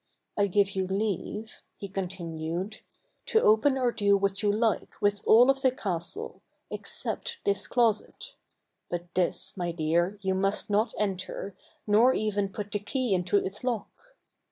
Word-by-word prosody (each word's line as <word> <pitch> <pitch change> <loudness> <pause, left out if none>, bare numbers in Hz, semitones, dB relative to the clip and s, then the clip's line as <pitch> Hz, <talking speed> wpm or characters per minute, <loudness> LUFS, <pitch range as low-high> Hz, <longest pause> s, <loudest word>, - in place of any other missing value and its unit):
I 205 -1 +2
give 200 +1 +2
you 190 -1 -1
leave," 210 +2 -3 0.2
he 200 - -6
con 190 -1 -3
tinued 170 +3 -5 0.2
" - - -44
to 445 - +4
open 265 - +4
or 250 -2 +2
do 200 -3 +3
what 195 0 -1
you 205 -1 +3
like, 220 +1 0
with 205 -1 +2
all 245 +4 +8
of 270 0 -3
the 260 - +5
castle, 210 - -4 0.3
except 470 - -4
this 200 -1 0
closet; 240 - 0 0.6
but 175 0 -5
this, 185 +1 0
my 175 -3 -2
dear, 170 +4 0
you 190 0 +1
must 195 +2 0
not 215 +4 +2
enter, 195 -1 -3 0.3
nor 225 +5 +5
even 205 -2 0
put 205 +1 -6
the 205 - -1
key 235 +2 -1
into 180 +2 +2
its 200 +4 -2
lock. 240 -5 -2
205 Hz, 160 wpm, -28 LUFS, 190-220 Hz, 0.6 s, all